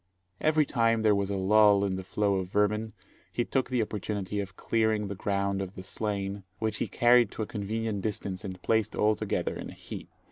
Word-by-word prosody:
Every 155 -1 +3
time 115 -4 +2
there 105 -1 +5
was 100 -1 0
a 100 - -1
lull 100 +1 +5
in 95 -1 -1
the 95 - -5
flow 100 +1 +1
of 95 -1 -3
vermin, 105 +2 +1 0.4
he 120 - -1
took 130 -2 0
the 125 -3 +2
opportunity 105 -1 -3
of 100 -2 -5
clearing 110 -2 +1
the - - -2
ground 100 0 -1
of 95 0 -6
the 95 - -7
slain, 100 0 -3 0.2
which 110 +1 -1
he - - -1
carried 120 0 +5
to 110 - -3
a - - -3
convenient 110 -1 -3
distance 100 -2 -3
and 95 -2 -6
placed 110 -2 +1
all 105 +1 +3
together - - -2
in - - -6
a - - -9
heap. - - -8
105 Hz, 210 wpm, -29 LUFS, 100-110 Hz, 0.4 s, there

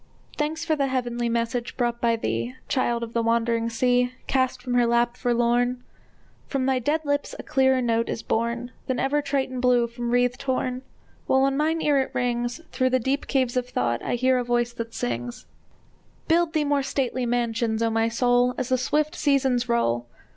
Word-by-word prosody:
Thanks 310 +2 -2
for 315 - +1
the 280 -2 0
heavenly 240 -2 -1
message 235 +1 -2
brought 240 -1 -1
by 230 -1 +3
thee, 115 - -3
Child 240 -3 0
of 230 0 -7
the 235 - +1
wandering 230 0 +1
sea, 245 +1 +1
Cast 260 -1 0
from 250 0 -4
her 245 -1 +3
lap, 235 0 +2
forlorn! 245 +1 +1 0.6
From 270 -2 -1
thy 265 -1 +2
dead 295 +6 0
lips 285 0 -1
a - - -7
clearer 265 -2 +2
note 230 -1 +1
is - - -3
born 235 +2 -1 0.2
Than 260 - -1
ever 270 +4 +1
Triton 275 -2 -2
blew 245 -1 +3
from 235 0 -5
wreathed 245 +1 +1
horn! 255 -1 -1 0.5
While 265 - +3
on 270 0 +2
mine 315 +3 0
ear 290 -2 +3
it 265 - -5
rings, 240 +2 -1
Through 255 0 +1
the 255 - +3
deep 265 +4 -1
caves 255 -3 +1
of 250 0 -1
thought 120 - -1
I - - -1
hear 255 +1 +2
a - - -1
voice 240 0 0
that 230 -1 -6
sings: 120 0 -4 0.8
Build 335 0 +2
thee 310 -2 +1
more 285 -1 +2
stately 260 -2 -1
mansions, 230 -1 0
O 225 - +1
my 225 0 +1
soul, 245 +1 +2
As 255 0 -2
the 255 -1 +2
swift 300 +4 0
seasons 265 -4 +1
roll! 120 - +1
245 Hz, 190 wpm, -25 LUFS, 235-265 Hz, 0.8 s, by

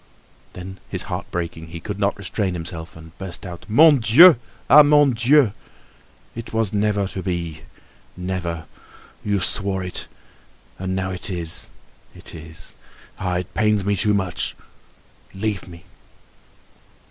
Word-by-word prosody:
Then, 95 +1 -9
his - - -1
heart - - -5
breaking, 85 -2 -4
he 85 +1 -8
could 100 +3 -6
not 100 0 +1
restrain 100 -1 -2
himself 85 -1 -6
and 80 0 -13
burst 95 0 -6
out: 85 -2 -9
"Mon 145 +5 +7
Dieu! 140 - +8 0.3
Ah! 150 - +9
Mon 145 -1 +5
Dieu! 125 0 +4 0.8
It 115 0 -8
was 110 -3 0
never 105 -1 +1
to 95 - -5
be—never. 85 0 -6 0.6
You 100 -1 0
swore 95 +1 0
it. 90 - -3 0.7
And 95 0 -2
now 95 0 -2
it 90 +1 -3
is—it 85 -3 -4
is! 80 0 -8 0.4
Ah, 90 -2 -1
it 90 -1 -5
pains 105 -2 +2
me 100 0 +2
too 105 +1 +2
much, 95 -3 -1 0.8
leave 100 -1 -2
me!" 85 -1 -12
95 Hz, 135 wpm, -22 LUFS, 85-105 Hz, 0.8 s, Ah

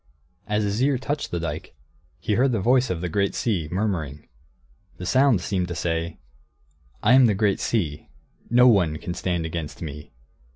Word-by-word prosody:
As 105 0 0
his 100 +3 -1
ear 135 0 +3
touched 145 +4 -3
the 85 - -2
dike, 80 -1 -5 0.4
he 105 - -1
heard 125 +4 +2
the 110 - +1
voice 125 +5 +3
of 85 -3 -2
the 90 - -2
great 100 +3 0
sea, 90 -10 -1
murmuring. 85 -8 -2 0.7
The 90 - -7
sound 130 -2 +3
seemed 90 0 -1
to 85 - -5
say, 85 -1 -2 0.9
"I 115 - +5
am 130 -1 +7
the 105 - +2
great 100 0 +1
sea. 80 -10 -2 0.4
No 125 +2 +6
one 90 -10 +3
can 85 +2 -5
stand 90 -2 -2
against 80 -2 -5
me. 75 -2 -8
95 Hz, 175 wpm, -24 LUFS, 85-115 Hz, 0.9 s, am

